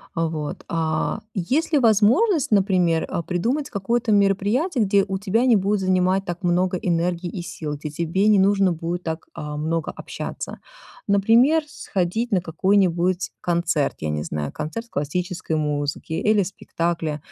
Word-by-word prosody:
Вот, 160 -3 -3
а 160 +3 -1 0.2
есть 260 - 0
ли 305 - +4
возможность, 250 - +3
например, 185 -5 +3
э - - -2
придумать 245 - -1
какое-то 225 +3 -1
мероприятие, 205 - +2
где 195 -1 +3
у 190 -1 -2
тебя 215 +5 +1
не 245 -3 +5
будет 200 0 +1
занимать 185 +1 +2
так 175 0 -5
много 180 +1 +1
энергии 175 0 -1
и 175 0 -6
сил, 155 -3 -5
где 150 +1 -6
тебе 170 +6 0
не 210 -2 +5
нужно 195 -1 +3
будет 170 +2 -4
так, 160 0 -4
а, 150 0 -5
много 160 +2 -2
общаться? - - -7 0.5
Например, 230 +10 +4
сходить 220 - -2
на 190 -3 +2
какой-нибудь 180 +1 +1
концерт, 170 -4 0
я 80 - -3
не 75 0 -2
знаю, 75 -3 -4
концерт 160 +10 -5
классической 170 +2 -3
музыки 150 0 -2
или 210 +5 +2
спектакль, 165 -4 -3
180 Hz, 150 wpm, -23 LUFS, 165-205 Hz, 0.5 s, не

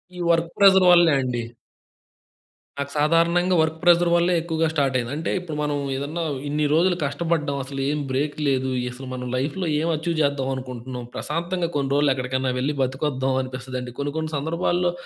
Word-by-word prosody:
ఈ - - -8
work 165 0 +2
pressure 190 -2 +6
వల్లే 170 -3 +6
అండి. 125 -2 -2 1.4
నాకు 140 0 -3
సాధారణంగా 170 +4 +3
వర్క్ 160 0 +1
ప్రెషర్ 175 0 +5
వల్లే 175 +1 +3
ఎక్కువగా 165 -1 0
స్టార్ట్ 140 -4 +1
అయింది. 120 -1 -3
అంటే 160 +2 -3
ఇప్పుడు 170 -4 -7
మనం 150 -1 -1 0.2
ఏదన్నా 145 +5 -3 0.2
ఇన్ని 150 +1 0
రోజులు 175 +3 +3
కష్టపడ్డాం 150 -1 -1
అసలేం 140 +2 -2
బ్రేక్ 145 +3 -1
లేదు. 130 -1 +1 0.2
అసలు 130 +2 -9
మనం 125 0 -5
లైఫ్‌లో 150 +9 -2
ఏం 160 - -1
అచీవ్ 165 +2 -2
చేద్దాం 140 -2 0
అనుకుంటున్నాం. 125 -1 -7
ప్రశాంతంగా 170 +2 -2
కొన్ని 140 -1 -1
రోజులెక్కడికన్నా 130 -2 +1
వెళ్లి 145 +3 -1
బతికొద్దాం 130 0 -1
అనిపిస్తుందండి. 125 -1 -6
కొన్ని 140 0 -2
కొన్ని 160 0 -3
సందర్భాల్లో 175 +4 0
150 Hz, 155 wpm, -23 LUFS, 130-170 Hz, 1.4 s, ప్రెషర్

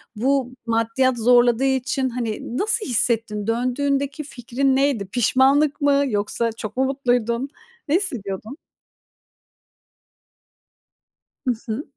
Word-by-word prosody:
Bu 260 +3 0
maddiyat 230 +3 +1
zorladığı 240 +1 +4
için, 265 0 0
hani, 235 0 -4
nasıl 435 +4 0
hissettin? 225 -4 0
Döndüğündeki 275 +5 -1
fikrin 265 0 -1
neydi? 270 -6 +1
Pişmanlık 265 +8 +2
mı, 285 0 +3
yoksa 220 +1 -1
çok 220 +1 -8
mu 265 - +3
mutluydun? 245 -2 0 0.4
Ne 300 - +2
hissediyordun? 240 - -3 2.9
I - - +4 0.2
hı. 225 +6 -3
250 Hz, 100 wpm, -22 LUFS, 230-275 Hz, 2.9 s, zorladığı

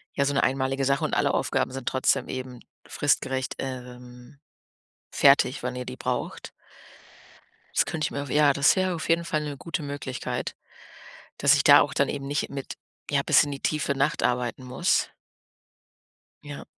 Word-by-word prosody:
ja, 140 - +2
so 145 - 0
'ne 135 - +2
einmalige 135 +1 0
Sache 140 +1 +1
und - - -1
alle - - +2
Aufgaben - - 0
sind 135 -1 -7
trotzdem 130 0 +1
eben 130 -1 -6 0.3
fristgerecht, 130 -1 -1
ähm, 125 0 -8 0.8
fertig, 140 -1 +4
wenn 125 0 -3
ihr 125 0 -5
die - - -7
braucht.“ - - -4 1.2
Das - - +3
könnte 155 -1 -2
ich - - -9
mir 140 - -3
ja, 150 -1 +5
das 140 +1 +4
wäre 185 -1 0
auf 160 - -5
jeden 165 +1 +3
Fall 155 -2 -1
'ne 145 -1 -5
gute 165 +2 -4
Möglichkeit, 140 -3 -5 0.8
dass 140 +1 +5
ich 140 - +1
da 145 - +8
auch 145 -1 -1
dann 140 -2 +1
eben 140 -1 -4
nicht 145 +1 -2
mit 135 -1 -6 0.4
ja, - - +2
bis - - +5
in 145 - -4
die 140 - -6
tiefe 150 -2 -1
Nacht 140 +2 0
arbeiten 125 0 -1
muss. 125 0 0 1.3
Ja. 145 -1 -8
140 Hz, 170 wpm, -26 LUFS, 130-145 Hz, 1.3 s, da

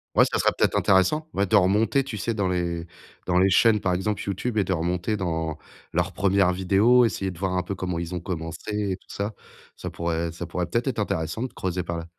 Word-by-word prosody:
Ouais, - - +7
ça - - 0
serait - - +3
peut-être - - +2
intéressant. 100 - +3
Ouais 100 - +1
de 95 - +4
remonter, 105 +8 +3
tu 135 - -5
sais, 115 +3 -1
dans 100 -3 0
les 85 -2 -2 0.4
dans 90 0 +2
les 95 +2 +5
chaînes 105 +2 +4
par 95 - +1
exemple, 100 +3 -1
YouTube, 105 +4 -2
et 105 - +4
de 95 - -3
remonter 90 +4 -1
dans 80 -4 -2 0.3
leur - - 0
première 100 -2 +3
vidéo, 100 +7 +4
essayer 95 -4 0
de 90 - -12
voir 95 -1 -1
un 90 - 0
peu 100 +3 -4
comment 90 -2 -3
ils 85 +1 -4
ont 85 - -4
commencé 90 +4 -3
et - - 0
tout 95 - -22
ça. 100 +2 -3 0.4
Ça - - -6
pourrait 85 0 -2
ça 85 +2 -6
pourrait, 85 +1 -3
peut-être, 115 +7 -1
être 130 -4 -1
intéressant 100 +2 -2
de 130 - -4
creuser 90 -1 -2
par 85 -1 -4
là. 85 - -6
95 Hz, 235 wpm, -25 LUFS, 85-105 Hz, 0.4 s, Ouais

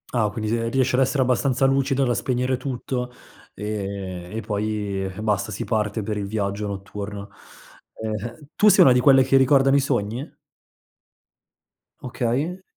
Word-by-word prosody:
Ah 110 -3 +2
quindi, 110 +2 -4
se 115 +1 0
riesci 130 +1 +1
ad 125 - +3
essere 130 +1 +2
abbastanza 130 +1 +1
lucida 135 0 +2
da 120 - +1
spegnere 125 +1 0
tutto, 125 -1 -4 0.4
e 100 -4 -5
e 110 - -2
poi 105 -2 -2
basta 105 -1 -1
si 95 - -4
parte 105 -1 -1
per 105 +1 -3
il 100 -1 -3
viaggio 100 0 -2
notturno. 100 +1 -6 0.7
Ehm, 110 +6 -6
tu 210 - +4
sei - - +7
una 130 - +6
di 125 - +3
quelle 135 +1 +6
che 135 +1 +3
ricordano 135 0 +4
i - - +5
sogni? 125 0 -2 1.7
Okay. 130 +9 -2
115 Hz, 150 wpm, -23 LUFS, 105-130 Hz, 1.7 s, sei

